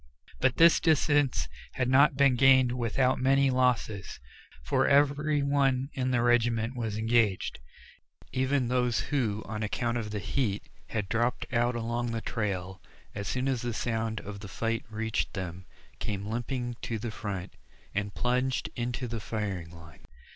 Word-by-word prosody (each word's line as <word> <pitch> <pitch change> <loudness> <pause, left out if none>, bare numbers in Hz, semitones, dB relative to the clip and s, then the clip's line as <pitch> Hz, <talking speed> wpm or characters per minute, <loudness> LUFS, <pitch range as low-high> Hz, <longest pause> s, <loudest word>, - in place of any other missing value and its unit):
But 130 - +2
this 165 0 +7
distance 145 -4 +2 0.3
had 130 -2 0
not 135 +2 +5
been 140 -2 +5
gained 130 -1 +5
without 125 +1 +1
many 135 +1 +3
losses, 125 -6 0 0.4
for - - +2
every 145 +1 +3
one 135 -1 +1
in 130 -1 -1
the 120 -2 +2
regiment 120 0 +2
was 110 -4 -3
engaged. 110 - +1 0.7
Even 130 0 +1
those 125 -1 +1
who, 110 -7 0
on 110 0 -5
account 115 +3 -1
of 105 -2 -4
the 105 - -4
heat, 105 -1 -1 0.2
had 105 -4 -3
dropped 120 +4 0
out 120 +1 +2
along 120 +1 -2
the 115 -1 -3
trail, 95 -5 -3 0.3
as 100 -1 -5
soon 125 +5 -1
as 130 -3 0
the 120 -2 -3
sound 115 -2 -1
of 100 0 -8
the 105 - -8
fight 115 +4 -2
reached 110 0 -2
them, 90 -1 -6 0.3
came 100 -2 -3
limping 120 +2 -3
to 115 - -3
the 110 +1 -4
front 100 -4 -5 0.4
and 100 0 -2
plunged 125 +1 0
into 125 +1 -3
the 115 -1 -4
firing 100 -6 -4
line. 85 -3 -14
120 Hz, 155 wpm, -29 LUFS, 105-130 Hz, 0.7 s, this